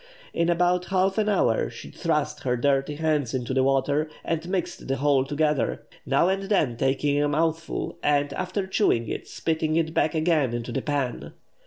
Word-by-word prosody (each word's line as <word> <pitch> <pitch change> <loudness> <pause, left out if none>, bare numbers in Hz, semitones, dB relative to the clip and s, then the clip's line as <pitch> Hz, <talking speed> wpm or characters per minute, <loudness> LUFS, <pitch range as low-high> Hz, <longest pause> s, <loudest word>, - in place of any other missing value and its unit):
In 170 0 +1
about 180 +1 +2
half 190 +2 +1
an 215 0 +1
hour 205 - +2
she - - -10
thrust 150 -3 -1
her 125 -2 0
dirty 140 +3 +1
hands 150 -5 0
into 125 0 -2
the 130 - +3
water, 140 +3 +1 0.2
and 165 +1 -2
mixed 185 -2 -3
the 135 - 0
whole 140 -1 +2
together, 150 -2 0 0.2
now 170 - +3
and 190 +1 +1
then 155 - +2
taking 140 +3 +1
a 145 - +2
mouthful, 160 +2 -1
and, 145 -1 +1
after 185 +5 -2
chewing 190 - +1
it, - - -5
spitting 160 -1 -1
it 160 -1 0
back 155 -1 +1
again 155 -6 +2
into 120 -1 -4
the 135 - -2
pan! 140 -4 -3
150 Hz, 180 wpm, -25 LUFS, 135-170 Hz, 0.2 s, the